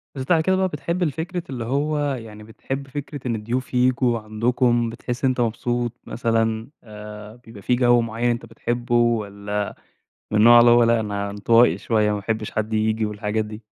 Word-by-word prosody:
بس 130 - -4
بعد 165 -3 +4
كده 190 +3 +2
بقى 190 0 +1
بتحب 170 +2 -3
الفكرة 170 +3 -3
اللي 125 -3 -4
هو 145 +5 0 0.2
يعني 110 -3 -10
بتحب 135 +5 -6
فكرة 145 0 -6
إن 115 - 0
الضيوف 120 +5 -4
ييجوا 125 -1 +2
عندكم 120 +2 +1
بتحس 125 +3 -4
أنت 130 -1 +1
مبسوط 120 +1 -1
مثلًا. 115 0 -1
آآ، 105 0 -10
بيبقى 115 -4 -14
في 125 - +1
جو 120 -1 +4
معين 115 +1 -1
أنت 115 -1 -2
بتحبه، 120 +1 -3
والّا 105 -3 0 0.6
من 105 - +1
النوع 120 +2 +8
اللي 120 0 +6
هو 120 0 +6
لأ 105 -3 0
انطوائي 115 +4 +3
شوية 110 -2 +1
ما 105 - 0
باحبش 110 +1 -3
حد 110 +1 -3
ييجي 110 0 +1
والحاجات 105 +1 -2
دي؟ 105 +1 -9
115 Hz, 175 wpm, -22 LUFS, 110-125 Hz, 0.6 s, النوع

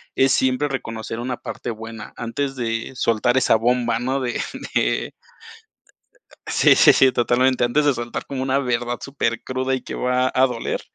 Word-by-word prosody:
Es 135 0 +3
siempre 130 +3 +1
reconocer 115 -4 -5
una 125 0 -3
parte 120 - -6
buena 110 0 -8
antes 135 +4 -3
de 115 -1 -3
soltar 120 +1 +1
esa 130 - +4
bomba, 120 0 +1
¿no?, 130 +2 -1
de 120 -2 -2 0.4
de - - 0 1.3
sí, - - +5
sí, - - +7
sí, 130 -1 +5
totalmente, 125 +2 +2
antes 140 +5 +2
de 145 - +4
soltar 120 0 -5
como 135 -2 -5
una 135 0 +1
verdad 120 -2 -1
supercruda, 130 0 -2
y 130 - -5
que - - -8
va 125 0 +1
a 130 +1 +4
doler, 120 -2 -3
125 Hz, 165 wpm, -21 LUFS, 115-130 Hz, 1.3 s, sí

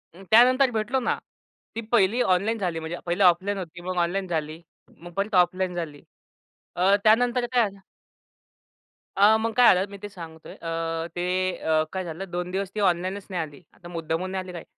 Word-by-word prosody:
त्यानंतर 245 +7 +4
भेटलो 225 +4 0
ना. 245 - 0 0.6
ती 230 - -2
1हिली 230 +1 +3
ऑनलाईन 200 +3 +1
झाली 175 -4 -2
म्हणजे 160 +2 -5
1हिले 175 +3 +1
ऑफलाईन 185 +3 +3
होती 175 -2 -7
मग 185 +1 -4
ऑनलाईन 180 +3 0
झाली, 160 -1 -3 0.4
मग 175 +1 -11
परत 200 +1 -1
ऑफलाईन 180 0 +2
झाली 155 -4 -5 0.7
अ, 190 +3 +4
त्यानंतर 240 +3 +3
काय 235 -4 +3
झालं. 195 0 -17 1.4
अ, 205 +2 +6
मग 225 +1 -2
काय 245 -1 +6
झालं 185 +2 0
मी 200 - -8
ते 205 - -6
सांगतोय 165 -4 -11
अ, 165 0 -3
ते 180 +1 0
अ, 155 -1 +1
काय 190 -1 -2
झालं 175 +3 -7
2 180 +1 -3
दिवस 195 0 -2
ती - - -2
ऑनलाईनच 185 +1 0
नाही 180 -3 -2
आली. 145 -3 -8
आता 175 - -14
मुद्दामून 165 +2 -3
नाही 190 -1 -3
आली 185 - -9
काय. 170 - -7
185 Hz, 185 wpm, -25 LUFS, 170-205 Hz, 1.4 s, अ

